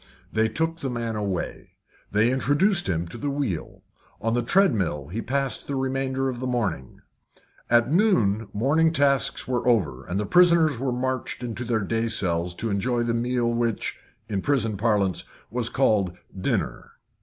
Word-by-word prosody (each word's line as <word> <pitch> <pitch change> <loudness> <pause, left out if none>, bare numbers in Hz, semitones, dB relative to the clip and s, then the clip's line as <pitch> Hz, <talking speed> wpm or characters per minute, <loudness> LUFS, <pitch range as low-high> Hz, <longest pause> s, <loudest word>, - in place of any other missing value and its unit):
They 110 0 +2
took 165 +7 -1
the 140 - -3
man 115 -2 -3
away. 100 -4 -4 0.4
They 105 +4 +3
introduced 170 - +2
him 85 -1 -1
to - - -8
the 145 - -2
wheel. 135 - -3 0.4
On 115 0 -1
the 120 - +2
treadmill 105 - +1
he 110 +6 -3
passed 135 +2 -2
the 140 - -2
remainder 135 0 -1
of 125 -2 -3
the 130 - -3
morning. 100 - -2 0.7
At 120 +2 +4
noon 115 - +3
morning 155 +9 +2
tasks 140 -4 +1
were 125 -1 -1
over, 75 - +2
and 95 +3 -2
the 105 - -1
prisoners 165 - +4
were 130 0 -1
marched 130 0 -3
into 120 0 -4
their 115 -2 0
day 115 +3 -1
cells 90 -5 -1
to 115 +3 -3
enjoy 120 +4 0
the 120 0 0
meal 120 0 0
which, 115 -2 -1 0.3
in 100 -2 -2
prison 115 -6 +1
parlance, 100 -4 +1 0.3
was 120 0 0
called 105 -9 +1 0.2
dinner. 95 - -2
120 Hz, 165 wpm, -25 LUFS, 105-135 Hz, 0.7 s, At